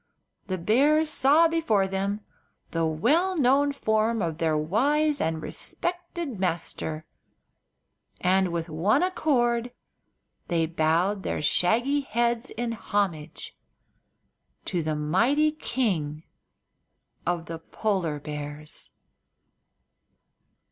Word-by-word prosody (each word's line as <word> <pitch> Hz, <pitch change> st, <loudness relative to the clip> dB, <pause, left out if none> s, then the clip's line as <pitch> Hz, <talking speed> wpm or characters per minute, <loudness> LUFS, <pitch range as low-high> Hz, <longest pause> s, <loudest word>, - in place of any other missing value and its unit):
the 185 Hz, -2 st, -2 dB
bears 290 Hz, -, +3 dB
saw 300 Hz, +4 st, +5 dB
before 320 Hz, -12 st, +1 dB
them 195 Hz, +2 st, -2 dB, 0.5 s
the 165 Hz, -1 st, 0 dB
well 305 Hz, -, +2 dB
known 280 Hz, +1 st, +4 dB
form 220 Hz, -3 st, +1 dB
of 165 Hz, -4 st, -2 dB
their 160 Hz, -2 st, +1 dB
wise 280 Hz, -, +1 dB
and 160 Hz, -1 st, -1 dB
respected 345 Hz, -, -4 dB
master, 160 Hz, -3 st, -2 dB, 1.1 s
and 185 Hz, 0 st, +2 dB
with 170 Hz, -1 st, -2 dB
one 170 Hz, -, +2 dB
accord 245 Hz, -9 st, +1 dB, 0.8 s
they 165 Hz, -2 st, +1 dB
bowed 170 Hz, +5 st, +1 dB
their -, -, -2 dB
shaggy 235 Hz, -, +2 dB
heads 235 Hz, -1 st, 0 dB
in 235 Hz, 0 st, -3 dB
homage 190 Hz, -8 st, -3 dB, 1.1 s
to 175 Hz, -3 st, -1 dB
the 155 Hz, -1 st, -1 dB
mighty 235 Hz, -, +2 dB
King 185 Hz, -, -2 dB, 1.0 s
of 175 Hz, -1 st, -1 dB
the 165 Hz, -1 st, -6 dB
Polar 175 Hz, -4 st, -2 dB
Bears. 150 Hz, 0 st, -7 dB
205 Hz, 100 wpm, -26 LUFS, 165-270 Hz, 1.1 s, saw